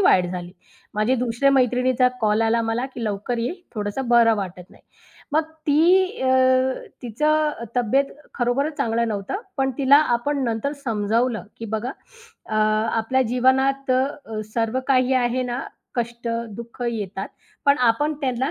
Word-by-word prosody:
वाईट 185 - +4
झाली. 180 -1 -6 0.4
माझ्या 215 +5 +2
दुसऱ्या 245 +3 +1
मैत्रिणीचा 255 0 +3
कॉल 215 +1 +2
आला 230 +1 +2
मला, 225 +3 -1
की 245 -3 -7
लवकर 210 +3 -2
ये, 240 +8 -1 0.2
थोडंसं 210 +5 -3
बरं 235 -2 +5
वाटत 185 -2 -6
नाही. - - -20 0.5
मग 315 +1 +3 0.2
ती 360 +6 +3
अ, 260 - +1 0.7
तिचं 300 +2 0
तब्येत 245 +4 +3 0.3
खरोखरच 275 +5 0
चांगल 230 -3 0
नव्हत. 200 -3 -4 0.2
पण 270 0 +1
तिला 275 +1 +6 0.2
आपण 280 +3 -2
नंतर 230 +4 -1
समजावलं, 225 +1 0 0.2
की 225 - -6
बघा 235 +4 -2 0.6
अ, 215 - -5
आपल्या 220 +4 +1
जीवनात 265 +2 +2
अ, 255 +1 +4 0.2
अ, 220 -1 -4
सर्व 230 +2 0
काही 260 -1 +3
आहे 250 0 +1
ना, 245 +1 -3 0.3
कष्ट, 235 -1 -3 0.3
दुःख 235 +1 -8
येतात, 200 -3 -4 0.4
पण 280 -1 +4
आपण 295 +6 -1
त्यांना 260 -1 -1
245 Hz, 145 wpm, -23 LUFS, 225-265 Hz, 0.7 s, तिला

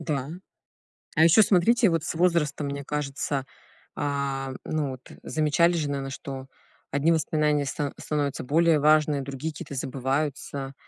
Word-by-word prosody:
Да. 150 -3 -3 0.9
А 160 - +5
еще 170 +7 +7
смотрите, 210 +4 +4
вот 165 -2 0
с - - -3
возрастом, 160 -4 +1
мне 140 0 -4
кажется, 140 -1 -2 0.5
а, 140 -2 -2
м, 130 - -6
ну 155 -3 -1
вот, 130 0 -11
э, - - -13
замечали 155 +3 +2
же, 155 -4 -1
наверно, 135 -1 -3
что 135 -1 -7 0.4
одни 145 +4 +2
воспоминания 150 -2 +1
ста 140 +1 -3
становятся 145 -2 -2
более 160 +3 +3
важными, 150 -1 +3
другие 140 +4 -5
какие-то 145 - -8
забываются. 135 +1 -2
145 Hz, 150 wpm, -26 LUFS, 140-160 Hz, 0.9 s, еще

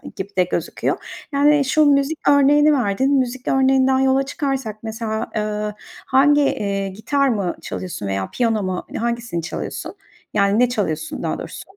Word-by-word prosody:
gibi 190 +1 -5
de 180 - +5
gözüküyor. 175 -1 -2 0.4
Yani, 290 0 +4
şu 305 +3 +3
müzik 285 +2 +1
örneğini 290 +2 +5
verdin. 260 +2 +1
Müzik 255 0 -3
örneğinden 265 0 +3
yola 265 0 +3
çıkarsak 270 -5 -3
mesela, 220 0 -4
ııı, 210 0 -2 0.3
hangi, 290 +3 +4
eee, 200 -7 -1
gitar 270 +8 0
mı 200 -7 -1
çalıyorsun 175 - -5
veya 95 0 -2
piyano 225 -4 0
mu 185 -1 -3
hani - - -6
hangisini 235 -6 -2
çalıyorsun? 165 - -5 0.4
Yani, 200 +1 +2
ne 250 - +4
çalıyorsun 160 -10 -3
daha - - -1
doğrusu? - - -8
235 Hz, 155 wpm, -20 LUFS, 200-275 Hz, 0.4 s, de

